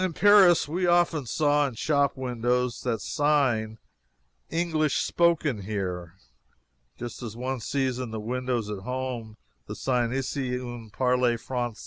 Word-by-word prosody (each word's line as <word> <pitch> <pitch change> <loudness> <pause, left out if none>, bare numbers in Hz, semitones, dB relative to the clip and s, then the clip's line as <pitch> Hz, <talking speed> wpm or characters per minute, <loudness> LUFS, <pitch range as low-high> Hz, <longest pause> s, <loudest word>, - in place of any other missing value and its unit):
In 185 -2 -1
Paris 195 -4 +6
we 175 +4 -1
often 175 -5 +2
saw 145 +1 +2
in 130 - -7
shop 140 +2 +1
windows 125 -1 -1
the 120 -3 -1
sign 120 -3 +1 0.7
"English 160 -3 0
Spoken 160 -9 +1
Here," 90 -4 -4 0.8
just 120 0 -7
as 115 -2 -7
one 130 +1 -3
sees 130 +2 -1
in 130 -2 -4
the 110 0 -5
windows 125 0 -2
at 105 - -4
home 125 -1 -5 0.3
the - - -6
sign 125 -3 0
"Ici 130 -1 -2
on 120 -3 -8
parle 125 +1 +1
francaise." 120 -1 -4
125 Hz, 140 wpm, -26 LUFS, 115-145 Hz, 0.8 s, Paris